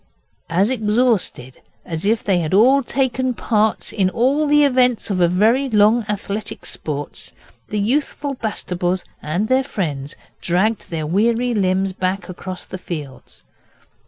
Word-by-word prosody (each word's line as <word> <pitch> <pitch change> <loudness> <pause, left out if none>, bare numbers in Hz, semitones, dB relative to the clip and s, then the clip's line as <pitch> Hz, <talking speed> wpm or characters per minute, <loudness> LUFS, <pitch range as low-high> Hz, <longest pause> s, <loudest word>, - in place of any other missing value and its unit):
As 190 +7 +2
exhausted 215 - 0 0.2
as 165 +2 -4
if 220 +2 +1
they 190 -3 +2
had 165 +2 0
all 260 +7 +6
taken 260 -1 -1
part 215 -1 0
in 190 -3 +2
all 270 +9 +1
the 295 0 +5
events 250 -5 +2
of 185 -2 0
a 175 - +5
very 225 +10 +2
long 215 +1 +4
Athletic 205 +1 -4
Sports, 145 -2 -6 0.3
the 210 - -3
youthful 275 +6 -1
Bastables 185 -6 -2 0.2
and 175 +8 -1
their 260 +2 +3
friends 150 - -4 0.3
dragged 195 +6 0
their 160 -2 -3
weary 230 +8 +1
limbs 190 -2 +1
back 185 0 -2
across 185 0 -7
the 185 - -8
fields. 150 -7 -8
210 Hz, 140 wpm, -20 LUFS, 180-245 Hz, 0.3 s, all